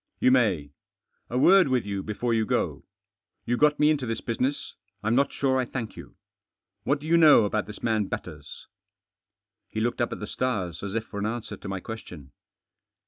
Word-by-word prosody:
"You 130 Hz, -, +4 dB
may. 95 Hz, -, +2 dB, 0.6 s
A 125 Hz, -, -2 dB
word 185 Hz, +7 st, +6 dB
with 130 Hz, -4 st, +1 dB
you 100 Hz, -1 st, -3 dB
before 110 Hz, +4 st, -2 dB
you 110 Hz, -1 st, +2 dB
go. -, -, -1 dB, 0.6 s
You 120 Hz, -, +1 dB
got 150 Hz, +3 st, +3 dB
me 150 Hz, +1 st, +5 dB
into 140 Hz, -5 st, -1 dB
this 115 Hz, -, -2 dB
business. 130 Hz, +5 st, -2 dB, 0.3 s
I'm 110 Hz, +2 st, +1 dB
hot 140 Hz, -, +2 dB
sure 130 Hz, -1 st, +1 dB
I 130 Hz, -, 0 dB
thank 115 Hz, -3 st, -5 dB
you. -, -, -12 dB, 0.7 s
What 140 Hz, +1 st, +1 dB
do 150 Hz, -, -11 dB
you 170 Hz, +2 st, +4 dB
know 150 Hz, -9 st, +7 dB
about 105 Hz, 0 st, -1 dB
this 105 Hz, -, -10 dB
matt 110 Hz, -3 st, +1 dB
Batters?" -, -, -7 dB, 1.0 s
He 110 Hz, -, -4 dB
looked 120 Hz, +3 st, -1 dB
up 120 Hz, -, 0 dB
at -, -, -5 dB
the 105 Hz, -, -4 dB
stars, 95 Hz, -9 st, -2 dB
as 100 Hz, +1 st, -5 dB
if 115 Hz, -, 0 dB
for 100 Hz, -, -7 dB
att 105 Hz, -, -1 dB
answer 115 Hz, 0 st, -4 dB
to -, -, -10 dB
my 95 Hz, -1 st, -3 dB
question. 90 Hz, -9 st, -9 dB
115 Hz, 195 wpm, -26 LUFS, 105-130 Hz, 1.0 s, know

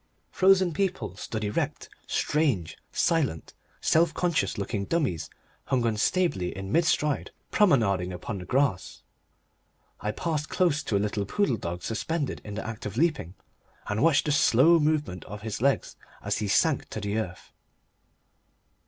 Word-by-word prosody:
Frozen 190 Hz, -2 st, +4 dB
people 185 Hz, -, -2 dB
stood 110 Hz, +2 st, -5 dB
erect, 105 Hz, 0 st, -2 dB, 0.2 s
strange, 135 Hz, -, 0 dB, 0.2 s
silent, 145 Hz, -, 0 dB, 0.3 s
self 165 Hz, 0 st, +3 dB
conscious 165 Hz, -, 0 dB
looking 100 Hz, 0 st, -2 dB
dummies 140 Hz, -, -1 dB, 0.4 s
hung 130 Hz, -3 st, +1 dB
unstably 110 Hz, -, +1 dB
in 95 Hz, 0 st, -6 dB
mid 170 Hz, +6 st, +3 dB
stride, 150 Hz, -2 st, +1 dB, 0.2 s
promenading 110 Hz, -, +3 dB
upon 95 Hz, +3 st, -5 dB
the 90 Hz, -, -8 dB
grass. 125 Hz, -4 st, 0 dB, 1.0 s
I 105 Hz, -, -3 dB
passed 150 Hz, +5 st, -2 dB
close 165 Hz, -5 st, +2 dB
to 100 Hz, -, +1 dB
a 100 Hz, -, 0 dB
little 100 Hz, -1 st, -2 dB
poodle 140 Hz, -, +1 dB
dog 85 Hz, -2 st, -5 dB
suspended 145 Hz, +6 st, -2 dB
in 105 Hz, -1 st, -7 dB
the 110 Hz, -, -5 dB
act 110 Hz, -2 st, -5 dB
of 105 Hz, -, -7 dB
leaping, 150 Hz, -, 0 dB, 0.5 s
and 105 Hz, +1 st, -2 dB
watched 155 Hz, -2 st, +4 dB
the 150 Hz, -, +1 dB
slow 145 Hz, +4 st, +5 dB
movement 150 Hz, -, 0 dB
of 105 Hz, +1 st, -9 dB
his 110 Hz, -1 st, -4 dB
legs 140 Hz, +1 st, +1 dB, 0.3 s
as -, -, -1 dB
he 105 Hz, -, -2 dB
sank 140 Hz, +9 st, +2 dB
to 100 Hz, -1 st, -3 dB
earth. 95 Hz, -5 st, -5 dB
120 Hz, 145 wpm, -27 LUFS, 100-160 Hz, 1.0 s, slow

